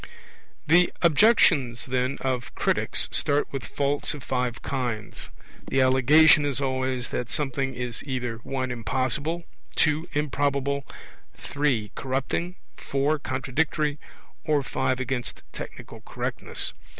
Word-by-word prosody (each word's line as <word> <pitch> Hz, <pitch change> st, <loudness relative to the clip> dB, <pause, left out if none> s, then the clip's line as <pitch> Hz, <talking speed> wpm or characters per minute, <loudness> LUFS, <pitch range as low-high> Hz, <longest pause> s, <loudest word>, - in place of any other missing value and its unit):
The 175 Hz, +3 st, +5 dB
objections, 160 Hz, -, +4 dB
then, 130 Hz, +1 st, 0 dB
of 125 Hz, -3 st, -2 dB
critics -, -, +1 dB
start 145 Hz, -1 st, +1 dB
with 135 Hz, -3 st, -3 dB
faults 145 Hz, +1 st, -1 dB
of 140 Hz, -, -9 dB
five 125 Hz, -2 st, -2 dB
kinds: 120 Hz, -5 st, -3 dB, 0.4 s
the 135 Hz, -, +1 dB
allegation 140 Hz, +4 st, +6 dB
is 140 Hz, -3 st, 0 dB
always 130 Hz, -2 st, -1 dB
that 120 Hz, -2 st, -3 dB
something 135 Hz, -2 st, -2 dB
in 125 Hz, -1 st, -4 dB
either 125 Hz, -4 st, -3 dB
(1) 130 Hz, +2 st, -3 dB
impossible, 130 Hz, +8 st, -1 dB, 0.3 s
(2) 155 Hz, +2 st, +2 dB
improbable, 140 Hz, -1 st, 0 dB, 0.5 s
(3) 135 Hz, -8 st, -1 dB
corrupting, 135 Hz, +7 st, -2 dB, 0.2 s
(4) 145 Hz, +3 st, 0 dB
contradictory, 145 Hz, +3 st, -1 dB, 0.4 s
or 150 Hz, -3 st, +2 dB
(5) 130 Hz, -1 st, -1 dB
against 130 Hz, -1 st, -3 dB
technical -, -, -8 dB
correctness. -, -, -2 dB
135 Hz, 115 wpm, -26 LUFS, 125-150 Hz, 0.5 s, allegation